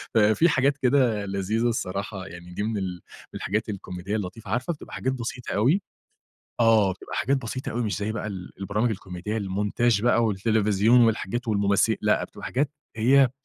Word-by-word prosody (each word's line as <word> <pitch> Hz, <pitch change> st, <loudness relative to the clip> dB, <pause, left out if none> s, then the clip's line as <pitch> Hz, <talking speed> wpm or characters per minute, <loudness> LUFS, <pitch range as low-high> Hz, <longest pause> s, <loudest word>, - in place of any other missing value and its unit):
ففي 110 Hz, +10 st, +5 dB
حاجات 140 Hz, 0 st, +2 dB
كده 125 Hz, -6 st, +2 dB
لذيذة 100 Hz, +4 st, 0 dB
الصراحة، 100 Hz, -3 st, -3 dB
يعني 85 Hz, 0 st, -10 dB
دي 100 Hz, -, -2 dB
من 110 Hz, 0 st, -1 dB
ال 90 Hz, -2 st, -4 dB, 0.3 s
الحاجات 105 Hz, +3 st, -2 dB
الكوميدية 95 Hz, 0 st, -5 dB
اللطيفة، 100 Hz, +1 st, -5 dB
عارفة 125 Hz, +9 st, 0 dB
بتبقى 150 Hz, -, -12 dB
حاجات 130 Hz, -, -1 dB
بسيطة 125 Hz, 0 st, -5 dB
أوي 135 Hz, -, +3 dB, 0.8 s
آه 110 Hz, -4 st, +5 dB
بتبقى 95 Hz, -, -8 dB
حاجات 140 Hz, +2 st, +2 dB
بسيطة 130 Hz, 0 st, -4 dB
أوي 120 Hz, -, -1 dB
مش 105 Hz, -6 st, -1 dB
زي 105 Hz, +2 st, -2 dB
بقى 110 Hz, -, -4 dB
ال 95 Hz, -4 st, -7 dB
البرامج 105 Hz, +4 st, 0 dB
الكوميدية، 95 Hz, +1 st, -4 dB
المونتاج 105 Hz, +2 st, +1 dB
بقى 120 Hz, -1 st, +3 dB
والتلفزيون 110 Hz, +2 st, +3 dB
والحاجات 115 Hz, +2 st, -1 dB
والممثل 100 Hz, -2 st, +2 dB
لأ -, -, +2 dB
بتبقى -, -, -9 dB
حاجات 140 Hz, +3 st, 0 dB, 0.3 s
هي 130 Hz, +3 st, +5 dB
110 Hz, 165 wpm, -25 LUFS, 100-120 Hz, 0.8 s, ففي